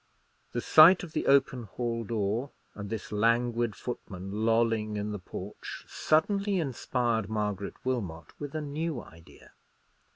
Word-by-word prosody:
The -, -, -1 dB
sight 170 Hz, +5 st, +8 dB
of 165 Hz, -3 st, -8 dB
the -, -, -1 dB
open 135 Hz, -2 st, +4 dB
hall 115 Hz, +2 st, -3 dB
door, 110 Hz, +4 st, -1 dB, 0.2 s
and 100 Hz, -1 st, -7 dB
this 110 Hz, -2 st, -5 dB
languid 115 Hz, +1 st, +1 dB
footman 95 Hz, -6 st, -6 dB, 0.2 s
lolling 115 Hz, -2 st, +2 dB
in 105 Hz, +1 st, -2 dB
the 105 Hz, -, -4 dB
porch, 90 Hz, -, -8 dB
suddenly 195 Hz, +5 st, +1 dB
inspired 120 Hz, -, -1 dB
Margaret 105 Hz, -2 st, -2 dB
Wilmot 90 Hz, -12 st, -3 dB
with 145 Hz, 0 st, -6 dB
a 155 Hz, -, -1 dB
new 150 Hz, 0 st, -3 dB
idea. 80 Hz, -6 st, -15 dB
115 Hz, 135 wpm, -29 LUFS, 105-140 Hz, 0.2 s, sight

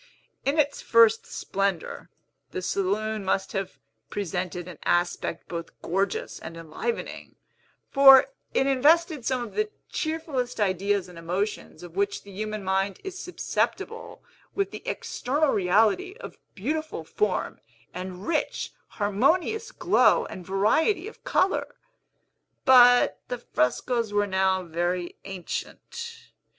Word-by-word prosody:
In 280 Hz, +3 st, +1 dB
its 290 Hz, -2 st, +1 dB
first 230 Hz, -1 st, +5 dB
splendor, 195 Hz, -4 st, -2 dB, 0.4 s
the 185 Hz, -, -5 dB
saloon 205 Hz, +3 st, -1 dB
must 190 Hz, 0 st, 0 dB
have 195 Hz, -1 st, -4 dB, 0.3 s
presented 180 Hz, -2 st, -3 dB
an 175 Hz, -4 st, -10 dB
aspect 175 Hz, -1 st, 0 dB
both 170 Hz, -1 st, -7 dB
gorgeous 195 Hz, +2 st, -1 dB
and 165 Hz, +1 st, -8 dB
enlivening; 165 Hz, -, -5 dB, 0.6 s
for 270 Hz, -1 st, +9 dB, 0.3 s
it 270 Hz, -, +3 dB
invested 300 Hz, +2 st, +3 dB
some 255 Hz, -2 st, 0 dB
of 235 Hz, -, -8 dB
the 430 Hz, 0 st, 0 dB, 0.2 s
cheerfullest 310 Hz, -7 st, -2 dB
ideas 195 Hz, -1 st, +1 dB
and 175 Hz, -2 st, -11 dB
emotions 180 Hz, +4 st, -3 dB
of 175 Hz, -1 st, -11 dB
which 200 Hz, +1 st, -1 dB
the 200 Hz, -, -12 dB
human 215 Hz, +1 st, -4 dB
mind 190 Hz, +1 st, 0 dB
is 385 Hz, -1 st, -6 dB
susceptible 455 Hz, +5 st, -3 dB, 0.3 s
with 395 Hz, 0 st, 0 dB
the -, -, -7 dB
external 290 Hz, +4 st, 0 dB
reality 220 Hz, -, +2 dB
of -, -, -10 dB, 0.2 s
beautiful 300 Hz, -, -3 dB
form, 205 Hz, +4 st, -1 dB, 0.3 s
and 185 Hz, +1 st, -6 dB
rich, 320 Hz, -2 st, -1 dB
harmonious 320 Hz, -, +1 dB
glow -, -, +3 dB
and 180 Hz, -2 st, -9 dB
variety 315 Hz, -, +2 dB
of 445 Hz, -, -12 dB
color. 440 Hz, -6 st, +1 dB, 0.9 s
But 245 Hz, -1 st, +7 dB
the 245 Hz, -, -3 dB
frescos 230 Hz, -, 0 dB
were 205 Hz, 0 st, +3 dB
now 190 Hz, -1 st, +1 dB
very 175 Hz, +1 st, -2 dB
ancient. 455 Hz, -, -7 dB
210 Hz, 120 wpm, -26 LUFS, 185-285 Hz, 0.9 s, for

